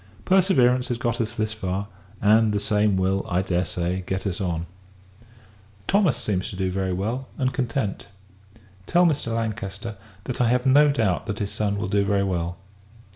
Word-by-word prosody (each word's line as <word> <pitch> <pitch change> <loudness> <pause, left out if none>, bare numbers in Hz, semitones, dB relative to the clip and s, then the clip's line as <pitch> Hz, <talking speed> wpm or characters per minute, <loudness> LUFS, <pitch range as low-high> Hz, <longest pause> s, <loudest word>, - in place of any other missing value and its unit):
Perseverance 130 -10 +4
has 120 - -2
got 120 +1 -1
us 115 0 -3
thus 110 -2 -1
far; 95 -1 -3 0.3
and 110 +1 +4
the 105 - +1
same 105 -1 +2
will, 95 +1 +1
I 90 +2 +1
dare 90 -1 0
say, 90 +3 -2
get 95 +1 -2
us 95 -2 -2
on. 85 -3 -2 1.2
Thomas 195 - +3
seems 95 -3 -2
to - - -8
do 95 -1 -1
very 95 0 -1
well, 110 +9 -2
and 130 -2 0
content. 120 -6 -2 0.8
Tell 175 +1 +4
Mr. 140 -8 0
Lancaster, 110 -1 -4 0.3
that 125 +2 -3
I 120 - +3
have 125 +1 +1
no 145 +3 +6
doubt 110 -7 0
that 105 - -3
his 105 -3 -3
son 100 -1 -1
will 105 - -2
do 100 +1 +2
very 100 0 +1
well. 90 -2 -2
105 Hz, 180 wpm, -24 LUFS, 95-120 Hz, 1.2 s, no